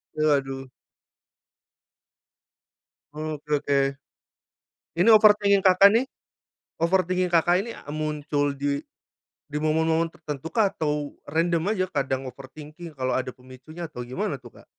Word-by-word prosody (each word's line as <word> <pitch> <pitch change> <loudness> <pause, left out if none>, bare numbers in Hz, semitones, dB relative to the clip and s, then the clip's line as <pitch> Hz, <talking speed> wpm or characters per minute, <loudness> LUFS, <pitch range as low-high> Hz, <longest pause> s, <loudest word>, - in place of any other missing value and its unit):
Waduh. 135 -3 0 2.4
Oke 155 -1 -5 0.2
oke, 140 -1 +1 1.2
ini 180 +6 +3
overthinking 210 -2 +6
Kakak 195 +2 +6
nih? 245 +4 +2 0.7
Overthinking 180 +1 +1
Kakak 175 +2 +3
ini, 230 - -7
eee, 145 - -9
muncul 150 -2 -1
di, 140 0 -1 0.7
di 150 0 -4
momen-momen 160 +1 +1
tertentu 155 -1 -7
kah 220 -4 +3
atau 150 -2 -2
random 165 +5 0
aja 185 -3 0
kadang 135 -5 -2
overthinking 150 +6 -10
kalo 130 0 0
ada 130 0 -2
pemicunya 130 +7 -10
atau 125 -5 -7
gimana 140 +7 -3
tuh, 125 -3 -14
Kak? - - -18
155 Hz, 120 wpm, -25 LUFS, 140-180 Hz, 2.4 s, overthinking